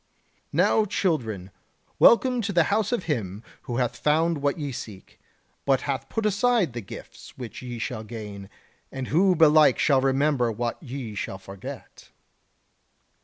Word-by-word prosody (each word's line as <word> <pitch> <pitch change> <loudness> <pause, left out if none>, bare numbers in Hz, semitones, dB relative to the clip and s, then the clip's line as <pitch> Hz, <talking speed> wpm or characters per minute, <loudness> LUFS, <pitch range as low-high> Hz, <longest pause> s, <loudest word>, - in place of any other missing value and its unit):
Now, 220 - +3
children, 125 - -1 0.5
welcome 250 +1 +5
to 205 -1 -2
the 170 -3 +4
house 215 0 +1
of 240 -7 0
him 110 - -3 0.2
who 120 - -4
hath 125 -1 0
found 160 +1 +2
what 140 +3 0
ye 145 -3 -4
seek, 105 -5 -9 0.4
but 135 -2 +2
hath 135 -1 -3
put 225 - -2
aside 210 - +2
the 120 - -4
gifts 95 - -11
which 120 -4 -8
ye 125 -1 -6
shall 110 -1 -4
gain; 105 -3 -8 0.4
and 130 -1 -5
who 185 +4 +4
belike 155 -4 +6
shall 135 -3 +3
remember 135 -2 +2
what 120 +2 -3
ye 130 -6 -6
shall 100 -1 -4
forget." 95 0 -10
135 Hz, 150 wpm, -25 LUFS, 115-170 Hz, 0.5 s, belike